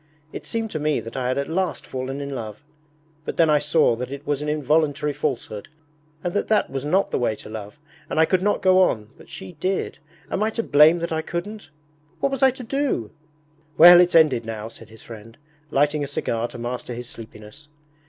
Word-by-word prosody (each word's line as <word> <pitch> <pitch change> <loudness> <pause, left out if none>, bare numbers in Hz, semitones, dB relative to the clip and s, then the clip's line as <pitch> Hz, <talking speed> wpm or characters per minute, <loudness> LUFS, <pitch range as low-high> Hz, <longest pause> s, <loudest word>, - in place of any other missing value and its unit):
It - - -8
seemed 225 -2 -3
to 155 - -3
me 150 0 0
that 115 - -9
I 130 -2 -2
had 130 - -1
at 140 - -1
last 180 +2 -2
fallen 130 +2 -5
in 140 0 -5
love, 110 0 -7 0.6
but - - -5
then 160 -2 +4
I 150 - +4
saw 150 -4 +2
that 125 +2 -5
it 140 +1 -7
was 145 -1 -1
an 150 - -3
involuntary 150 0 +1
falsehood, 120 -8 -4 0.6
and 175 - -2
that 205 - -1
that 215 -9 +1
was 135 0 -3
not 185 +7 +1
the - - 0
way 120 -3 0
to - - -12
love, 110 +2 -8 0.3
and - - -1
I 160 - +6
could 185 +2 +1
not 205 +2 0
go 185 0 +5
on, 110 - +1
but - - -17
she - - -8
did. 190 +3 -2 0.3
Am 190 - -1
I 215 - +2
to 230 +1 -3
blame 150 +2 +6
that 170 - -3
I 160 0 0
couldn't? 175 +2 -6 0.5
What 275 - 0
was 270 - -3
I 265 - +7
to 255 0 -7
do?' 255 - -2 0.7
'Well, 175 +2 +10
it's 180 -1 +2
ended 150 -8 +5
now!' 110 -1 -6
said 115 -1 -15
his 110 0 -15
friend, 115 0 -12 0.3
lighting 145 +1 +1
a - - -3
cigar 120 -4 -2
to - - -11
master 120 0 -5
his 120 0 -7
sleepiness. 110 +4 -12
145 Hz, 220 wpm, -23 LUFS, 120-175 Hz, 0.7 s, Well